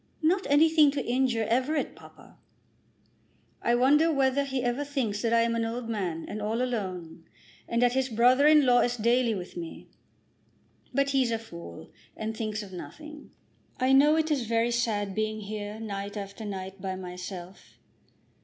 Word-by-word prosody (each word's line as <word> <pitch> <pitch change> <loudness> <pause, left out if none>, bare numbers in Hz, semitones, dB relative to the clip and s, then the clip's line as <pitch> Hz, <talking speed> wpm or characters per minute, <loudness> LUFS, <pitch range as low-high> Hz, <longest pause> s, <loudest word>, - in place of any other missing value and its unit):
"Not 365 +5 +2
anything 310 +1 +5
to 280 -3 -3
injure 245 -2 +1
Everett, 260 +6 0
papa!" - - -16 1.3
"I 235 - +2
wonder 295 +6 +4
whether 275 -1 +2
he 265 -2 -2
ever 245 +3 0
thinks 255 -8 -2
that 230 - 0
I 230 0 +4
am 230 0 +1
an 230 0 0
old 230 +1 -4
man 180 -7 -3
and 215 - -5
all 220 +3 -1
alone, 185 -9 -4 0.4
and 235 +1 +1
that 245 0 +3
his 265 0 0
brother 250 +5 +4
in 300 -2 +6
law 245 -1 +5
is 245 0 +1
daily 235 0 +2
with 180 -2 -7
me. 170 -2 -8 1.0
But 275 +2 +1
he's 265 -3 +2
a 230 - 0
fool, 170 - -11 0.3
and 220 0 -4
thinks 215 -1 -3
of 190 -2 -11
nothing. 300 - -10 0.5
I 260 +1 +3
know 295 +3 +6
it 315 0 0
is 265 -6 0
very 230 +1 +1
sad 215 -4 -1
being 215 +1 -2
here 210 +1 -6
night 200 -1 -5
after 200 +2 -7
night 190 -1 -6
by 190 0 -3
myself." 180 0 -9
230 Hz, 170 wpm, -28 LUFS, 205-265 Hz, 1.3 s, in